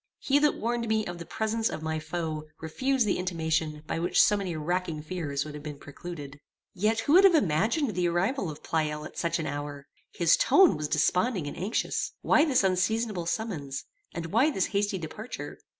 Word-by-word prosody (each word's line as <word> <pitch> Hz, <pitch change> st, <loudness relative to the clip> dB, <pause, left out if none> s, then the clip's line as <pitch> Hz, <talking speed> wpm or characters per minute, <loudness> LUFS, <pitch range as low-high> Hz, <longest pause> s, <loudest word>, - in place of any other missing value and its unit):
He 280 Hz, +1 st, +2 dB
that 295 Hz, 0 st, +3 dB
warned 235 Hz, 0 st, -1 dB
me 220 Hz, -1 st, +1 dB
of 175 Hz, -1 st, -6 dB
the 170 Hz, -, -8 dB
presence 220 Hz, +1 st, -1 dB
of 155 Hz, -, -6 dB
my 160 Hz, 0 st, -1 dB
foe 155 Hz, -1 st, -4 dB
refused 255 Hz, +10 st, 0 dB
the 195 Hz, -, 0 dB
intimation 160 Hz, -4 st, -1 dB
by 165 Hz, -, -2 dB
which 170 Hz, -, +1 dB
so 210 Hz, -, +6 dB
many 190 Hz, -4 st, -3 dB
racking 165 Hz, 0 st, -2 dB
fears 155 Hz, -5 st, -3 dB
would 150 Hz, -, -7 dB
have 150 Hz, -, -7 dB
been 150 Hz, -1 st, -7 dB
precluded. 145 Hz, -1 st, -9 dB, 0.3 s
Yet 210 Hz, +4 st, +1 dB
who 290 Hz, -, +1 dB
would 375 Hz, +3 st, +8 dB
have 385 Hz, -3 st, +7 dB
imagined 225 Hz, -, +2 dB
the 180 Hz, 0 st, +1 dB
arrival 185 Hz, -, 0 dB
of 150 Hz, -, -9 dB
Pleyel 150 Hz, -1 st, -1 dB
at -, -, -10 dB
such 170 Hz, -, 0 dB
an 160 Hz, -, -3 dB
hour? 145 Hz, -1 st, -5 dB, 0.3 s
His -, -, +4 dB
tone 390 Hz, -7 st, +5 dB
was 150 Hz, 0 st, -3 dB
desponding 180 Hz, -, +1 dB
and 145 Hz, -, -5 dB
anxious. 190 Hz, +6 st, -2 dB
Why 305 Hz, -, +5 dB
this 265 Hz, -8 st, +3 dB
unseasonable 190 Hz, 0 st, 0 dB
summons? 165 Hz, -10 st, -3 dB, 0.3 s
and 170 Hz, 0 st, -5 dB
why 255 Hz, +8 st, +4 dB
this 195 Hz, -11 st, 0 dB
hasty 200 Hz, 0 st, +1 dB
departure? 210 Hz, +8 st, -7 dB
175 Hz, 195 wpm, -28 LUFS, 155-220 Hz, 0.3 s, would